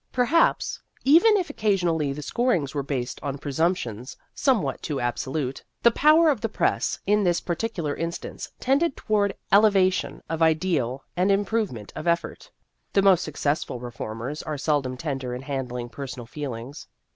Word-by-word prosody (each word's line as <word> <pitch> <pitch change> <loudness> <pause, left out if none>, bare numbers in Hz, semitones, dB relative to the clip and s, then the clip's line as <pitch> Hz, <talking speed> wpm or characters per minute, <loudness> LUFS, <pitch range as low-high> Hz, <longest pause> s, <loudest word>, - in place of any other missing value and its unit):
Perhaps, 260 +7 +2 0.2
even 345 +10 +6
if 355 -6 -2
occasionally 175 - +1
the 150 +2 -5
scorings 180 - 0
were 145 - -1
based 130 -3 -3
on 140 -1 -3
presumptions 140 - -2 0.2
somewhat 255 -8 +1
too 145 -3 -3
absolute, 130 +3 -2 0.2
the 235 - +7
power 310 +6 +5
of 265 -8 0
the 225 - -1
press - - 0
in 210 +1 +3
this 175 -2 +2
particular 170 -5 -2
instance 170 +1 -5
tended 275 +4 +1
toward 205 -2 +1 0.2
elevation 195 -2 +3
of 165 0 -3
ideal 155 -6 +1
and 185 +2 +2
improve 205 +2 +1
ment 110 -4 -9
of - - -5
effort. 170 0 -1 0.4
The 195 - +4
most 190 -3 +5
successful 145 -4 -2
re 120 0 -7
formers 115 +6 -5
are 155 -2 -4
seldom 140 -3 0
tender 135 -4 -3
in 125 - -7
handling 125 -3 -4
personal 130 -2 -7
feelings. 135 +1 -7
160 Hz, 155 wpm, -25 LUFS, 135-205 Hz, 0.4 s, the